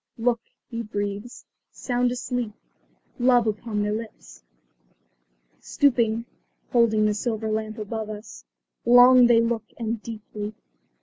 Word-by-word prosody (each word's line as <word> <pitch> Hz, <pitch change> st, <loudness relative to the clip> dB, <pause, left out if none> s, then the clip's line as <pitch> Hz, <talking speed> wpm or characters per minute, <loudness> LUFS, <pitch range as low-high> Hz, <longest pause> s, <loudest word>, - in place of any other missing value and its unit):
"Look," 235 Hz, 0 st, +1 dB, 0.3 s
he 230 Hz, -1 st, -5 dB
breathes. 205 Hz, +2 st, -5 dB, 0.3 s
"Sound 245 Hz, -1 st, -1 dB
asleep. 245 Hz, -2 st, -3 dB, 0.7 s
Love 245 Hz, -1 st, +4 dB
upon 210 Hz, 0 st, -2 dB
their 210 Hz, 0 st, -1 dB
lips." 215 Hz, -, -8 dB, 1.2 s
Stooping, 235 Hz, -5 st, +1 dB, 0.5 s
holding 220 Hz, -3 st, +3 dB
their 210 Hz, -, +2 dB
silver 220 Hz, 0 st, -2 dB
lamp 215 Hz, +1 st, -3 dB
above 215 Hz, 0 st, -5 dB
us, 210 Hz, -1 st, -9 dB, 0.4 s
long 245 Hz, +1 st, +7 dB
they 235 Hz, -1 st, +5 dB
look 230 Hz, -1 st, -1 dB
and 230 Hz, -1 st, -3 dB
deeply. 215 Hz, -1 st, -7 dB
225 Hz, 115 wpm, -24 LUFS, 215-240 Hz, 1.2 s, long